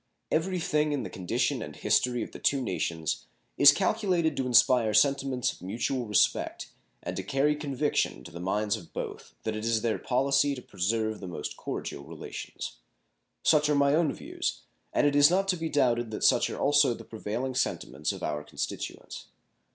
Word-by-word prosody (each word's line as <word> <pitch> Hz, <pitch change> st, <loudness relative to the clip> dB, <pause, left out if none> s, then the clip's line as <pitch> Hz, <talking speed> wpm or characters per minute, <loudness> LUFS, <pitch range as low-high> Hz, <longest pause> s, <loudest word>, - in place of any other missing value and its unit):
Every 180 Hz, +3 st, 0 dB
thing 150 Hz, -2 st, +1 dB
in 140 Hz, -4 st, -1 dB
the -, -, -6 dB
condition 90 Hz, -2 st, -1 dB
and -, -, -7 dB
history 125 Hz, -2 st, +1 dB
of -, -, -8 dB
the -, -, -10 dB
two 140 Hz, -, +2 dB
nations 85 Hz, -, -2 dB, 0.3 s
is 140 Hz, 0 st, +9 dB
calculated 180 Hz, -3 st, +1 dB
to 130 Hz, -, -1 dB
inspire 120 Hz, -3 st, +4 dB
sentiments 135 Hz, +1 st, +2 dB
of -, -, -18 dB
mutual 120 Hz, +6 st, -2 dB
respect 105 Hz, -, +1 dB, 0.3 s
and 90 Hz, -, -4 dB
to 95 Hz, -, -2 dB
carry 135 Hz, +9 st, +1 dB
conviction 145 Hz, -, -1 dB
to -, -, -11 dB
the 85 Hz, -, -8 dB
minds 105 Hz, +4 st, 0 dB
of 95 Hz, -7 st, -11 dB
both -, -, -6 dB
that 110 Hz, -1 st, -2 dB
it 110 Hz, -, -5 dB
is 115 Hz, -1 st, +1 dB
their 115 Hz, -2 st, 0 dB
policy 140 Hz, +2 st, +2 dB
to 125 Hz, -, -8 dB
preserve 110 Hz, +3 st, -1 dB
the 95 Hz, -, -7 dB
most 85 Hz, -4 st, -5 dB
cordial 70 Hz, -, -5 dB
relations. 80 Hz, +2 st, -7 dB, 0.7 s
Such 150 Hz, -1 st, +4 dB
are 150 Hz, -, +3 dB
my 140 Hz, 0 st, +3 dB
own 155 Hz, -2 st, +3 dB
views, -, -, -4 dB, 0.3 s
and -, -, +2 dB
it 145 Hz, -1 st, +2 dB
is 145 Hz, +1 st, +7 dB
not 195 Hz, +2 st, +1 dB
to 185 Hz, -, +3 dB
be 165 Hz, -1 st, -3 dB
doubted 120 Hz, -5 st, +1 dB
that 110 Hz, -, -5 dB
such -, -, +4 dB
are -, -, -5 dB
also 145 Hz, -3 st, +4 dB
the -, -, -11 dB
prevailing 115 Hz, +4 st, -4 dB
sentiments 75 Hz, -, -1 dB
of -, -, -8 dB
our 75 Hz, 0 st, -2 dB
constituents. -, -, -6 dB
125 Hz, 185 wpm, -28 LUFS, 105-145 Hz, 0.7 s, is